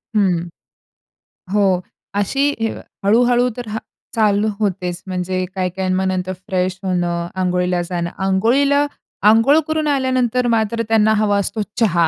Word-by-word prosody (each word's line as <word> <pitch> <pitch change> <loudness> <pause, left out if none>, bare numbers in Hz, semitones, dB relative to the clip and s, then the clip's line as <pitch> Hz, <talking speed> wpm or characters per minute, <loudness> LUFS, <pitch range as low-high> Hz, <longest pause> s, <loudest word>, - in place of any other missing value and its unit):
हं. 185 -5 +3 1.1
हो 205 -1 +3 0.6
अशी 270 +7 0 0.2
अ, - - -6 0.2
हळू-हळू 245 +3 +4
तर 240 -2 -6
हां, 220 +1 -3 0.4
चालू 210 -1 +2
होतेच, 180 -3 -2
म्हणजे 185 0 -2
काही 185 -1 0
काही 190 -1 -2
मग 190 +1 0
नंतर 185 0 -1
फ्रेश 185 0 -1
होणं, 175 -2 -1
अंघोळीला 180 -1 +1
जाणं, 170 -1 -2 0.2
अंघोळीला 275 +9 +3 0.4
अंघोळ 240 +8 +5
करून 315 -1 0
आल्यानंतर 255 -3 +1
मात्र 225 +1 0
त्यांना 220 -1 +4
हवा 205 -1 +2
असतो 200 +2 -1 0.2
चहा 170 -7 +3
205 Hz, 135 wpm, -19 LUFS, 185-235 Hz, 1.1 s, अंघोळ